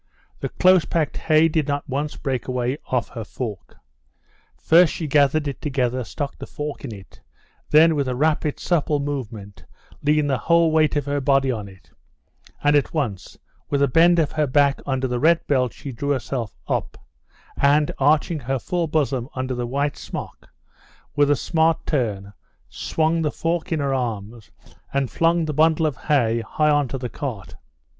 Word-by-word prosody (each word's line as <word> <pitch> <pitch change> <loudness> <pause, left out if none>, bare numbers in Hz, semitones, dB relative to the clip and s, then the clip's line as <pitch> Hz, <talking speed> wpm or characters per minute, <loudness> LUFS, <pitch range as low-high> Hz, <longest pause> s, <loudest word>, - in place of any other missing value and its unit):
The - - -3
close 185 -2 +4
packed 160 -4 -1
hay 155 0 +3
did 155 -2 0
not 145 0 -2
once 145 +3 -3
break 130 -3 -3
away 125 +2 -2
off 125 -2 -1
her 115 -2 -6
fork. 105 -3 -7 0.8
First 165 0 +5
she 165 - -4
gathered 145 +1 +2
it 140 - -5
together, 130 -3 -1
stuck 140 +4 -5
the - - -7
fork 150 -1 -6
into 115 -7 -6
it, 95 - -17 0.5
then 160 +2 +6
with 140 -3 -1
a 125 - -1
rapid, 150 +1 0
supple 155 -4 0
movement 115 -8 -6 0.4
leaned 150 0 +2
the 135 -3 0
whole 170 -1 +3
weight 155 -1 +3
of 145 -2 0
her 145 0 -1
body 135 -1 +2
on 105 -4 -4
it, 95 -6 -17 0.7
and 145 0 +4
at 145 +2 +1
once 115 -11 -3 0.3
with 140 - +1
a - - +4
bend 170 +6 +5
of 155 -4 +1
her 155 -1 0
back 140 +1 +2
under 130 -1 0
the 125 -1 -2
red 165 +4 +3
belt 130 -4 +1
she 140 +6 -8
drew 140 +4 -4
herself 130 -4 -2
up, - - -2 0.6
and 145 +1 +3
arching 150 +3 +2
her 135 +1 -2
full 175 +5 -2
bosom 140 -5 -1
under 130 0 -2
the 120 -1 -3
white 140 +3 -1
smock, - - -8 0.7
with 145 -1 +3
a 145 - +4
smart 160 +2 +1
turn 105 -8 -2 0.4
swung 160 +1 0
the 155 - +1
fork 165 +3 -2
in 160 - 0
her 140 -1 0
arms, 115 -3 -4 0.4
and 135 -2 -1
flung 165 0 +2
the 155 - -3
bundle 160 +2 +3
of 150 -4 0
hay 120 -7 +1
high 150 +7 +1
onto 145 -3 +1
the 125 -1 -4
cart. 120 -6 -6
140 Hz, 180 wpm, -22 LUFS, 125-155 Hz, 0.8 s, then